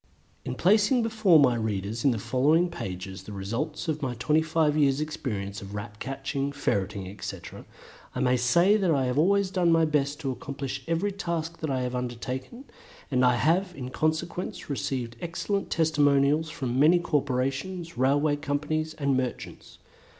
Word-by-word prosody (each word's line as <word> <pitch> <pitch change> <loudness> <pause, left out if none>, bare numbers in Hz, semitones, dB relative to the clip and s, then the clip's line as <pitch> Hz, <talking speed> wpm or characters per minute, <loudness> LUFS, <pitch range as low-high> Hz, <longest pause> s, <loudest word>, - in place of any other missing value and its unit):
In 125 - -4
placing 210 - +3
before 215 -6 +4
my 135 -5 +5
readers 110 -1 -2
in 140 - +5
the 120 - 0
following 150 - +2
pages 95 - -6
the - - -8
results 115 - -4
of 155 -1 -1
my 130 -3 -2
twenty 150 +7 +2
five 160 -1 +1
years' 140 -2 +3
experience 105 -10 -4
of 100 +1 -8
Rat 105 0 -7
catching, 135 +1 -3
Ferreting, 100 -8 -2
etc., 100 +2 -8 0.5
I - - -2
may 125 -1 +3
say 170 - +4
that 190 -4 +1
I 140 -5 +2
have 125 +3 0
always 195 +3 +3
done 180 -3 +2
my 165 0 +4
best 145 -1 0
to 135 -3 -1
accomplish 135 +1 -5
every 165 +5 0
task 170 -4 -4
that 155 - -3
I 130 -2 0
have 125 0 -3
undertaken, 125 - -5 0.5
and 130 -1 +2
I 125 -1 +5
have 175 +8 +1
in 130 -2 -6
consequence 160 +2 -2
received 125 -4 -3
excellent 195 +4 -2
testimonials 150 -1 +2
from 130 -6 -2
many 160 +5 +6
corporations, 145 +2 -2
railway 145 +4 +2
companies, 150 +2 -2
and 140 -3 0
merchants. 130 -2 -4
145 Hz, 165 wpm, -27 LUFS, 125-165 Hz, 0.5 s, many